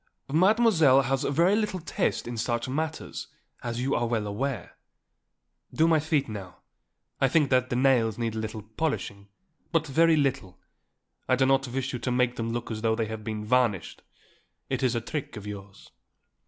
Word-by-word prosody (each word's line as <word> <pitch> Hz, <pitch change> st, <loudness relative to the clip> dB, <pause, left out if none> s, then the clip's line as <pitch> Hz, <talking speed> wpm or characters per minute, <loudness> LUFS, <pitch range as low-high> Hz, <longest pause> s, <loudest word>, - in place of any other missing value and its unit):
Mademoiselle 175 Hz, -, +5 dB
has 135 Hz, +1 st, 0 dB
very 170 Hz, +8 st, +3 dB
little 210 Hz, -3 st, -1 dB
taste 165 Hz, -, -1 dB
in 120 Hz, -, -4 dB
such 120 Hz, +1 st, -1 dB
matters, 155 Hz, +4 st, -4 dB, 0.3 s
as 120 Hz, -1 st, -4 dB
you 135 Hz, +3 st, 0 dB
are 120 Hz, -, +1 dB
well 115 Hz, -2 st, -1 dB
aware. 110 Hz, +1 st, -3 dB, 1.0 s
Do 160 Hz, -, +3 dB
my 160 Hz, -1 st, +4 dB
feet 150 Hz, -2 st, 0 dB
now; 100 Hz, -5 st, -8 dB, 0.6 s
I 135 Hz, -, +4 dB
think 145 Hz, +1 st, +2 dB
that 130 Hz, 0 st, +3 dB
the -, -, -1 dB
nails 120 Hz, -4 st, +3 dB
need 115 Hz, -2 st, -2 dB
a 110 Hz, -, -3 dB
little 110 Hz, -1 st, -5 dB
polishing; 110 Hz, -4 st, -3 dB, 0.4 s
but 165 Hz, -2 st, +2 dB
very 160 Hz, +3 st, +4 dB
little; 130 Hz, -11 st, -1 dB, 0.7 s
I 130 Hz, -, +5 dB
do 130 Hz, +1 st, +3 dB
not 135 Hz, 0 st, +2 dB
wish 130 Hz, +2 st, -3 dB
you 125 Hz, -, -3 dB
to 125 Hz, +2 st, -2 dB
make 125 Hz, 0 st, +1 dB
them 115 Hz, 0 st, -3 dB
look 120 Hz, 0 st, -4 dB
as 110 Hz, -1 st, -4 dB
though 110 Hz, 0 st, +2 dB
they 115 Hz, -1 st, -1 dB
had 110 Hz, 0 st, -6 dB
been 110 Hz, -1 st, -4 dB
varnished; 110 Hz, -7 st, +1 dB, 0.7 s
it -, -, 0 dB
is 125 Hz, -2 st, +1 dB
a 115 Hz, -, 0 dB
trick 130 Hz, -1 st, -5 dB
of 105 Hz, -, -8 dB
yours." 100 Hz, -1 st, -9 dB
125 Hz, 180 wpm, -27 LUFS, 110-140 Hz, 1.0 s, Mademoiselle